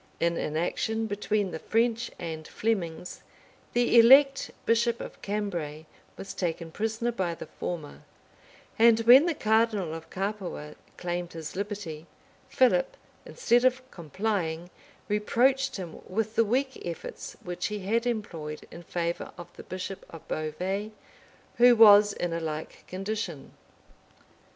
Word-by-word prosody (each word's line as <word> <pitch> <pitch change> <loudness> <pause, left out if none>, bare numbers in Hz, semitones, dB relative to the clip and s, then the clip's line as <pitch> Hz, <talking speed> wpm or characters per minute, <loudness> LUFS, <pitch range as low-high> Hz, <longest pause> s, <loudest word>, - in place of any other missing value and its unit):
In 170 0 +1
an 155 -1 -2
action 220 +6 -1
between 205 -1 -1
the 160 - -5
French 230 +3 0
and 160 -2 -6
Flemings, 180 -6 -3 0.5
the 240 0 +5
elect 270 +4 +6 0.2
bishop 230 +1 +2
of - - -9
Cambray 175 -7 -3 0.3
was 195 - -7
taken 165 -2 -3
prisoner 220 +5 -1
by 185 -7 -2
the - - -8
former; 160 -5 -6 0.8
and 230 0 +6
when 255 +8 +8
the 335 - 0
cardinal 215 -7 +1
of 165 0 -8
Capua 190 -6 -4 0.2
claimed 175 0 -4
his 160 -2 -7
liberty, 195 -6 -5 0.4
Philip, - - +2 0.3
instead 245 - +2
of 255 0 +2
complying, 175 -1 -3 0.4
reproached 260 +6 +2
him 175 -4 -8
with 220 +3 -2
the 230 - +3
weak 265 +5 -1
efforts 170 -1 -7
which 175 -1 -3
he 210 -1 -4
had 230 +5 0
employed 165 -10 -4
in 170 - -9
favor 170 0 -3
of 175 - -11
the - - -9
bishop 185 +1 -6
of 165 - -12
Beauvais, 185 +7 -3 0.7
who 245 0 +7
was 210 -2 +8
in 175 -3 -3
a 165 - -1
like 155 -1 -6
condition. 195 -5 -5
200 Hz, 135 wpm, -28 LUFS, 170-230 Hz, 0.8 s, when